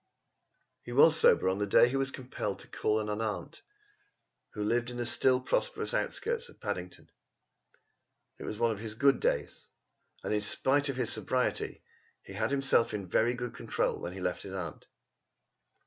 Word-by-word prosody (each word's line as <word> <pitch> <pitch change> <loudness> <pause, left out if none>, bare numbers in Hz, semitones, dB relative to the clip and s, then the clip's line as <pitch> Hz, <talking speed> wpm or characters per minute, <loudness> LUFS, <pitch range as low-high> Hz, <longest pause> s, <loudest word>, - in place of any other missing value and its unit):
He 120 - -9
was 150 +5 +7
sober 95 -11 +4
the 100 +1 -2
day 110 - +6
he 125 - -2
was 135 0 +1
compelled 130 -2 -4
to - - -11
call 110 0 0
on 105 - -4
an 105 +1 -2
aunt 105 -6 -4 0.9
who 105 - -3
lived 120 +3 0
in 120 - -7
the 120 - -2
still 130 +2 +3
prosperous - - -1
outskirts 475 -1 -1
of - - -18
Paddington. 90 -3 -6 1.3
It - - -7
was 105 - -5
one 115 +1 +2
of 105 - -4
his 110 -1 -5
good 135 +2 +4
days - - -2 0.5
and, - - -1
in 105 - +1
spite 140 +7 +2
of 135 - -2
his 125 -3 0
sobriety, 130 -1 -1 0.4
he - - -11
had 110 +3 -1
himself 135 -5 +2
in 100 -3 -5
very 115 +7 +2
good 125 0 -5
control - - -1
when 85 - -5
he 95 - -8
left 90 - -2
his 95 -1 -7
aunt. 85 -5 -6
115 Hz, 180 wpm, -30 LUFS, 105-130 Hz, 1.3 s, was